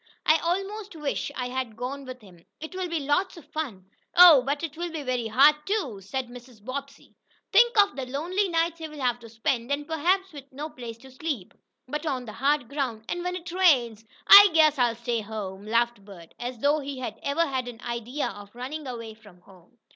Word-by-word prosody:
I 315 - +5
almost 390 +3 -3
wish 295 -2 -3
I 250 -1 -3
had 250 -4 -4
gone 270 +3 -5
with 255 -1 -9
him. 180 -5 -17 0.2
It 315 +4 -8
will 370 -1 -3
be 335 -2 -2
lots 290 +7 0
of 320 - -12
fun." 260 -13 -5 0.3
"Oh, 345 -6 +9
but 280 +4 -2
it 320 -2 -4
will 345 +1 -4
be 315 -3 -5
very 250 -3 -1
hard, 270 +7 +6
too," 315 - -1
said 255 +6 -4
Mrs. 245 -1 -13
Bobbsey. 275 +2 -7 0.4
"Think 475 -2 +5
of 405 -1 +4
the 265 -2 -5
lonely 350 +9 -1
nights 335 0 0
he'll 305 -2 -8
have 245 -2 0
to 230 -1 -12
spend, 235 +2 -2
and 290 +1 -1
perhaps 360 +4 0
with 275 -2 -11
no 295 +4 -6
place 240 -5 -8
to 265 - -13
sleep, 260 - -5 0.3
but 300 +4 -4
on 255 -4 -2
the 215 - -8
hard 280 0 +1
ground. 245 -5 -3
And 350 0 -3
when 360 0 -2
it 345 -1 -7
rains 255 - +3 0.2
" - - -28
"I 405 0 +11
guess 310 -3 +5
I'll 240 -2 +2
stay 235 0 -2
home!" 205 -2 -7
laughed 235 -1 +1
Bert, 180 -5 -13
as 245 +1 -5
though 290 +6 +2
he 280 -1 -6
had 255 - -6
ever 290 +4 +1
had 260 -4 -3
an 240 -2 -8
idea 240 +4 -3
of 205 -2 -10
running 270 +4 -6
away 230 -3 -6
from 205 -5 -19
home. 185 +5 -21
270 Hz, 215 wpm, -26 LUFS, 235-315 Hz, 0.4 s, I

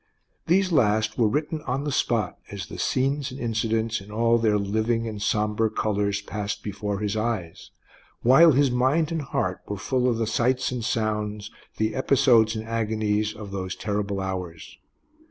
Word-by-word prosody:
These 185 +2 +3
last 110 -6 +2
were 115 - +5
written 150 +6 -1
on 130 +3 -1
the 145 - -2
spot, 115 -7 0
as 100 -3 -6
the - - -9
scenes 135 +1 0
and 130 +1 -9
incidents, 115 -2 -1
in 100 - -13
all 115 +2 +2
their 110 -2 +2
living 110 +3 0
and 105 -2 -6
sombre 105 +1 +1
colors, 105 -1 -1
passed 105 -1 -4
before 105 0 -3
his 105 +1 -2
eyes, 110 -7 -3 0.5
while 145 +6 +7
his 140 0 +3
mind 135 +6 +2
and 165 -1 -1
heart 95 -9 -2
were 105 - -4
full 125 +5 0
of 115 - 0
the 115 - 0
sights 125 +4 +1
and 125 -2 -3
sounds, 105 -1 -2 0.3
the 110 0 0
episodes 130 -5 +4
and 110 0 -5
agonies, 110 -2 -1
of 105 -2 -9
those 95 -2 -4
terrible 100 -1 -2
hours. 90 -9 -6
110 Hz, 170 wpm, -25 LUFS, 105-125 Hz, 0.5 s, while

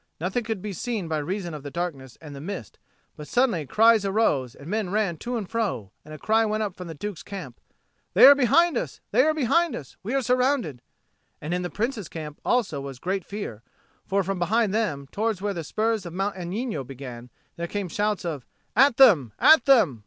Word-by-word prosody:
Nothing 190 +9 -1
could 220 -4 -4
be 210 -2 -4
seen 210 0 -3
by 160 -1 -1
reason 175 +3 -4
of 150 - -6
the 145 - -7
darkness 140 -6 -5
and 150 -3 -10
the 140 - -8
mist; 175 - -7 0.4
but 150 - -9
suddenly 225 - +1
cries 225 - +5
arose, 190 - +1
and 140 - -12
men 210 0 -1
ran 200 -3 0
to 245 +8 -3
and 210 -4 -4
fro; 200 - -2
and 155 - -13
a 155 - -7
cry 220 +7 +2
went 215 0 0
up 200 -3 -4
from 180 -1 -8
the 165 - -7
Duke's 205 +3 -6
camp, 200 -1 -9 0.5
"They - - +9
are 280 - +11
behind 285 +6 +3
us! - - -4
They - - +5
are 310 +3 +3
behind 310 +2 +2
us! 135 - -9
We 230 +7 -3
are 270 - +1
surrounded!" 250 - +1 0.6
And 155 +4 -4
in 180 - 0
the 180 - -3
Prince's 220 - -3
camp 150 -2 -8
also 215 - 0
was 135 -2 -7
great 185 +6 -2
fear; 200 - -6 0.4
for 195 +1 0
from 195 0 -3
behind 210 +4 +1
them, 160 -11 -1
towards 220 -2 -1
where 205 +1 -2
the 170 -3 -5
spurs 220 +6 -1
of 170 - -8
Mount 195 +2 -2
Agnino 185 - -3
began, 125 -2 -9 0.3
there 170 0 -4
came 200 +1 -3
shouts 205 +2 -1
of 150 -7 -4 0.3
"At 265 +1 +5
them, 170 - +6
at 315 -6 +6
them! 215 - +4
195 Hz, 210 wpm, -25 LUFS, 155-225 Hz, 0.6 s, are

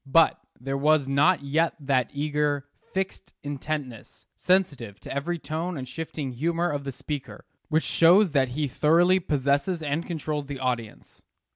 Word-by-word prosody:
But 160 +4 +4 0.2
there 135 +2 -3
was 150 -1 +3
not 140 +5 +3
yet 160 +4 +1
that 135 -4 +1
eager, 145 -1 -1 0.3
fixed 190 0 -4
intentness, 145 -4 -5
sensitive 140 - +1
to - - -7
every 160 +6 -2
tone 165 +2 -4
and 130 -1 -6
shifting 150 0 -5
humor 165 +7 0
of 145 -1 -4
the 135 - -3
speaker, 140 +2 -6 0.2
which 160 0 +2
shows 175 +3 +5
that 135 -3 +3
he 150 -1 +1
thoroughly 170 +7 +4
possesses 150 +2 0
and 150 +3 -1
controls 155 -4 -3
the 140 -1 -5
audience. 125 -4 -4
150 Hz, 150 wpm, -26 LUFS, 135-165 Hz, 0.3 s, shows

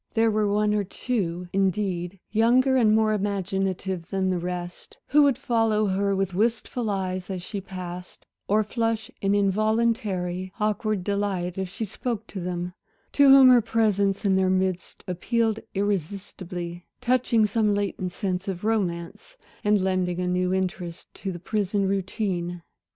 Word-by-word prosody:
There 225 0 +4
were 210 -1 +1
one 210 0 +2
or 210 -1 +1
two, 180 -4 -3
indeed, 190 -1 0
younger 245 +5 +4
and 220 -4 +4
more 220 -1 +3
imaginative 195 -3 -2
than 190 -1 0
the 180 - 0
rest, 175 0 -6
who 300 +2 +6
would 280 -4 +4
follow 225 -2 +1
her 200 0 +1
with 195 -1 -1
wistful 225 +3 0
eyes 185 -2 -2
as 185 -2 -4
she 200 +2 -5
passed, 180 -1 -8 0.2
or 215 +2 +3
flush 225 0 -2
in 195 0 +2
involuntary, 200 -3 0
awkward 215 -2 0
delight 195 -3 -1
if 190 -1 -2
she 220 - -3
spoke 220 +1 -4
to 195 - -6
them; 180 0 -3 0.4
to 285 -1 +5
whom 270 -1 +9
her 250 -1 +7
presence 205 -3 +1
in 195 -1 +4
their 190 0 +3
midst 185 -1 -1
appealed 225 +5 0 0.2
irresistibly, 185 -2 -3
touching 240 -3 +2
some 210 0 +1
latent 200 -3 -1
sense 185 -1 -3
of 185 -1 -4
romance, 210 - -2 0.3
and 210 -2 +3
lending 185 -2 0
a 180 - -1
new 180 0 0
interest 185 -2 -3
to 195 - -5
the 175 - -6
prison 200 +1 -1
routine. 185 -3 -2
195 Hz, 150 wpm, -25 LUFS, 180-215 Hz, 0.4 s, whom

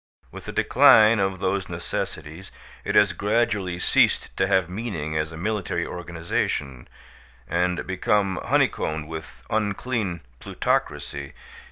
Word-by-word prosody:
With - - -10
the - - -5
decline 110 0 +6
of 95 -1 0
those 95 0 -1
necessities 80 +5 -5 0.3
it - - -2
has 105 -1 +5
gradually 105 -4 0
ceased 90 - +2
to 95 - +1
have 95 -3 +2
meaning 90 -6 -4
as 80 0 -1
a 80 - -8
military 90 -2 -2
organization, 80 -6 -3 0.6
and 90 +1 0
become 95 +1 0
honeycombed 80 -1 0
with 80 0 -9
unclean 105 -3 -1 0.2
plutocracy. 70 +1 -2
90 Hz, 120 wpm, -24 LUFS, 80-100 Hz, 0.6 s, decline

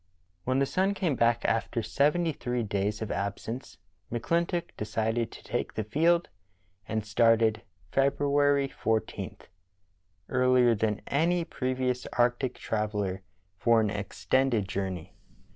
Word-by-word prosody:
When 130 +1 +1
the 140 - +3
sun 190 +7 +1
came 170 -8 0
back 120 0 +2
after 115 0 0
seventy 150 +9 +2
three 125 -4 -2
days 105 +1 -1
of 110 - -5
absence, 100 +5 -4 0.3
McClintock 170 - 0
decided 110 +2 -1
to - - -12
take - - -3
the 110 - -1
field, 165 - +2 0.6
and 110 -1 -2
started 110 0 +3 0.3
February 140 0 +3
14, 110 -4 -2 0.9
earlier 125 -2 +4
than 105 -1 -1
any 170 +4 +1
previous 130 -2 -2
arctic 120 +2 +1
traveller, 105 -3 -2 0.4
for 115 +1 +4
an 105 -2 +1
extended 110 +2 0
journey. 95 -3 -4
120 Hz, 120 wpm, -29 LUFS, 110-140 Hz, 0.9 s, earlier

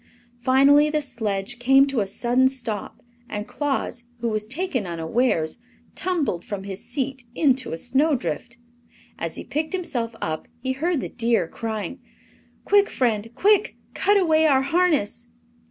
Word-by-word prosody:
Finally 275 +4 +5
the 305 0 +1
sledge 220 -5 -3
came 270 +3 +6
to 275 -3 -1
a 200 - 0
sudden 245 +6 +2
stop 235 -6 -5 0.3
and 210 0 -4
Claus, 270 -4 -2
who 235 -1 -2
was 215 -1 -2
taken 260 - -2
unawares, 170 +2 0 0.3
tumbled 325 - -1
from 205 -5 -5
his 195 -1 -6
seat 265 -2 -3
into 265 -3 +2
a 165 - -3
snowdrift. 240 - 0 0.6
As - - -3
he - - -6
picked 310 +4 -3
himself 245 -11 -2
up 155 0 -3
he 260 +2 -2
heard 310 +3 0
the - - -4
deer 230 -7 +1
crying: 220 +3 -5 0.7
"Quick, 405 0 +4
friend, 225 -3 0
quick! 415 0 +3 0.2
Cut 410 +1 +3
away 320 -4 +4
our 270 -3 +4
harness!" 275 - +1
255 Hz, 145 wpm, -24 LUFS, 215-295 Hz, 0.7 s, came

